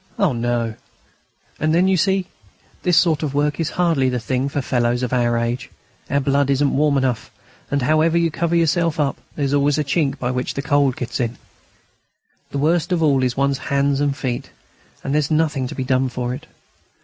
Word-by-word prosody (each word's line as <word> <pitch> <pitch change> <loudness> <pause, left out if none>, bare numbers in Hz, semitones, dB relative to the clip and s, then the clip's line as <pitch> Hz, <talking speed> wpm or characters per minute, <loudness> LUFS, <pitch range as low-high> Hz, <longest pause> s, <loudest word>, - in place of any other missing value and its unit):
"Oh, 190 -9 +2
no; 120 -1 -1 0.9
and 155 +1 +1
then, 180 +2 +4
you 190 - +3
see, 190 +1 +1 0.6
this 175 -3 +2
sort 165 -4 +3
of 145 -3 -3
work 145 +1 0
is 165 -1 0
hardly 165 -8 +1
the 125 -1 -1
thing 130 +3 -1
for 145 - -2
fellows 120 -1 0
of 125 - -2
our 120 -1 +2
age. 115 +1 -2 0.4
Our 140 - +2
blood 140 0 +1
isn't 140 +1 +2
warm 145 0 +3
enough, 125 -5 -1 0.4
and, 140 -2 0
however 155 +4 +3
you 170 -1 +2
cover 170 +2 -1
yourself 165 0 +1
up, 140 -2 0
there's 140 -2 -1
always 145 0 +2
a 150 - +1
chink 140 0 0
by 125 -2 -2
which 125 0 -3
the 140 - -3
cold 140 -3 +2
gets 125 - -4
in. 120 -1 -2 1.1
The - - -4
worst 160 +5 +1
of 170 -2 +1
all 140 -4 +3
is 125 -1 -1
one's 140 0 +1
hands 140 0 +2
and 140 -1 0
feet; 125 -3 -3 0.5
and 135 - -2
there's 150 -1 +1
nothing 155 -4 +1
to - - -7
be 130 - -2
done 130 0 +1
for 125 0 -3
it. 130 - -8
140 Hz, 200 wpm, -20 LUFS, 130-155 Hz, 1.1 s, then